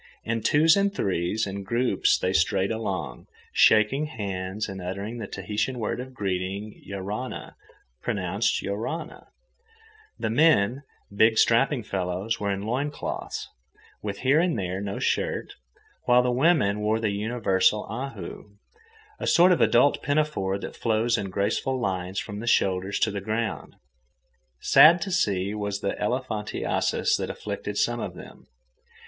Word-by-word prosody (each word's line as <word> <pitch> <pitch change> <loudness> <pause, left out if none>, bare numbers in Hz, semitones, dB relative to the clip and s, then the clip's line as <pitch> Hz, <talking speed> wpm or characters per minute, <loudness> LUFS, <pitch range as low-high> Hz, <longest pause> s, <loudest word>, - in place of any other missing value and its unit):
In 115 0 -2
twos 155 +8 +5
and 200 0 +2
threes 100 - -1
and 100 0 -5
groups 120 +5 +2
they 95 - -1
strayed 95 +3 +2
along, 110 -5 -4 0.3
shaking 110 +8 +4
hands 100 -4 -4
and 95 -2 -7
uttering 100 +6 -5
the 105 - -5
Tahitian 105 +8 -3
word 115 +1 -2
of 130 +1 -8
greeting—Ioarana, 100 +3 -4 0.5
pronounced 100 -1 -1
yo 100 - -2
rah 135 +11 -3
nah. - - -14 0.9
The 110 - -2
men, 130 -3 +3 0.3
big 110 +2 +4
strapping 120 +2 +3
fellows, 95 +3 -2
were 100 - -1
in 100 0 -2
loin 130 +7 -1
cloths, 145 - -5 0.5
with 100 -1 -5
here 135 +4 +4
and 170 -5 +1
there 95 -1 -3
no 100 -1 -4
shirt, - - -1 0.5
while 125 0 +5
the 125 - +1
women 125 - +3
wore 105 +1 +1
the 110 -2 0
universal 105 -1 +1
ahu, 110 -4 -7 0.6
a - - -3
sort 175 +2 +6
of 180 - +3
adult 125 +4 +4
pinafore 145 -10 0
that - - -7
flows 115 +1 +1
in 100 -2 -3
graceful 100 +7 -1
lines 95 -3 -3
from 100 +1 -4
the 115 - -6
shoulders 95 -2 +1
to 110 - +3
the 100 -1 -4
ground. 110 +3 -3 0.9
Sad 170 +3 +7
to 195 - -5
see 100 - 0
was 100 -1 -3
the 100 - -1
elephantiasis 110 -2 -1
that - - -4
afflicted - - -5
some - - +1
of - - -5
them. - - -13
105 Hz, 145 wpm, -26 LUFS, 100-125 Hz, 0.9 s, Sad